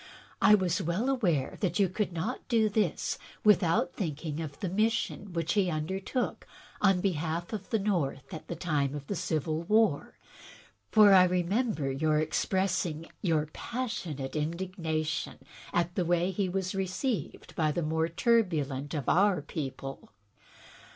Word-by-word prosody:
I 210 - +8
was 185 -4 0
well 185 +11 0
aware 175 - 0
that 180 -4 0
you 200 - +4
could 195 +2 -2
not 175 +9 -4
do 225 -3 +3
this 205 -5 0 0.2
without 175 -4 +4
thinking 155 -3 -3
of 145 -3 -7
the 190 - -2
mis 215 +5 +2
sion 205 -3 -4
which 165 -1 -1
he 200 -3 +2
undertook 190 - -2 0.3
on 195 -3 +4
behalf 170 0 -2
of 205 -3 -5
the 225 - +2
North 185 -6 -1
at 160 - -8
the 170 - -4
time 145 -5 -1
of 145 -1 -6
the 200 - -3
Civil 160 -2 -1
War, 210 -3 +2 0.7
for 210 -2 +7
I 185 -1 +8
remember 180 - 0
you 155 +3 +1
expressing 165 +1 0
your 160 -6 +1
passionate 185 - -4
indigna 165 0 -2
tion 155 - -3 0.3
at 175 0 0
the 180 - 0
way 175 0 +2
in - - +1
which 190 - -7
he 195 -3 +1
was 185 0 -2
received 195 - -3
by 155 -2 +2
the 170 +3 -1
more 160 +1 0
turbulent 160 - +1
of 145 - -3
our 195 0 +4
people. 135 -3 -6
175 Hz, 155 wpm, -30 LUFS, 155-200 Hz, 0.7 s, I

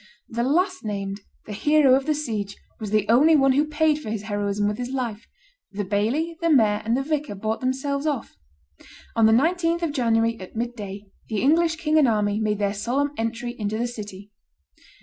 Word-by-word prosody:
The 235 +1 -2
last 365 +9 +1
named, 200 -1 -4 0.2
the 210 - -7
hero 295 +4 +4
of 270 +2 +2
the 305 - +2
siege, 215 -9 -3 0.2
was 215 - -5
the 215 0 +1
only 280 +9 +5
one 270 -2 +4
who 290 +3 +2
paid 305 0 +1
for 290 - -7
his 215 -2 -3
heroism 205 -1 -1
with 210 +2 -2
his 245 0 -3
life; 240 -5 -4 0.4
the 205 +1 -3
baillie, 240 - -1
the 335 - +1
mayor, 215 -8 +4
and 230 +3 +1
the 270 - -1
vicar 295 -6 -2
bought 220 +3 -2
themselves 275 +3 -1
off. 285 -5 -3 0.8
On 225 -1 +5
the - - +4
19th 335 +7 +2
of 330 - 0
January, 230 -3 +1
at 185 +3 -10
midday, 210 -4 -5 0.3
the 215 -1 -1
English, 325 +3 +3
king 315 -1 +2
and 285 - +5
army, 210 -2 +1
made 210 -1 0
their 200 -1 0
solemn 250 +8 -1
entry 230 +1 -3
into 210 +1 -2
the 235 - 0
city. 205 -4 -9
235 Hz, 195 wpm, -24 LUFS, 210-295 Hz, 0.8 s, only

